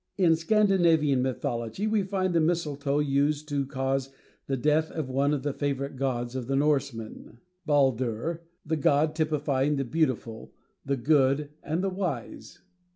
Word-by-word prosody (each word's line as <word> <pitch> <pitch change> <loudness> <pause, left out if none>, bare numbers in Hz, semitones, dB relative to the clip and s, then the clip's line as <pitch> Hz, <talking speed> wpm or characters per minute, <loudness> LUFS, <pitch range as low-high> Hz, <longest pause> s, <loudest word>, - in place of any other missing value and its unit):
In 175 -4 +4
Scandinavian 165 -7 +3
mythology 120 - -2
we 215 -1 +2
find 190 -1 -1
the 170 - +3
mistletoe 150 -4 0
used 145 +1 +1
to 140 -2 -1
cause 135 -1 -1 0.4
the 135 - -1
death 155 +4 +2
of 150 -5 -4
one 140 +2 +2
of 145 -3 -1
the 145 -1 -1
favorite 140 -1 -3
gods 125 -2 -2
of 125 -2 -4
the 135 - 0
Norsemen, 135 -6 -1 0.3
Baldur, 135 +2 +1 0.2
the 160 +1 -1
god 150 +2 +2
typifying 150 -3 0
the 135 -1 -1
beautiful, 125 -6 -2 0.3
the 140 0 -1
good, 140 +2 +2
and 160 +5 -2
the 195 - +1
wise. 185 -1 -5
145 Hz, 150 wpm, -27 LUFS, 135-160 Hz, 0.4 s, In